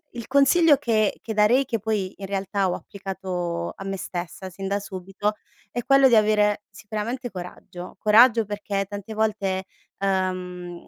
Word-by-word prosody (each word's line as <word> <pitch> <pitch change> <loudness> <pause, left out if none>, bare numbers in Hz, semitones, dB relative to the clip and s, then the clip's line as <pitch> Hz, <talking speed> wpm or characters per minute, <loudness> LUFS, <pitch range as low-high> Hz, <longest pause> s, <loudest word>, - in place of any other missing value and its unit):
il 235 -2 -7
consiglio 290 +3 +5
che 225 -6 +1
che 220 -1 -4
darei, 225 +6 +4
che 230 -3 -2
poi 205 -3 -1
in 195 - -7
realtà 195 0 -1
ho 180 - 0
applicato 185 -4 -4
a 195 - -9
me 195 0 -3
stessa 180 +1 -6
sin 195 +1 -6
da 200 +1 0
subito 195 +2 -3 0.4
è 240 -1 -3
quello 275 -1 +6
di 240 - +5
avere 210 -1 +3
sicuramente 225 +5 -5
coraggio. 180 -1 -9
Coraggio 225 +2 +6
perché 205 -1 -3
tante 205 +1 -7
volte, 205 -3 0 0.3
ehm, 185 -2 -2
205 Hz, 155 wpm, -24 LUFS, 190-220 Hz, 0.4 s, quello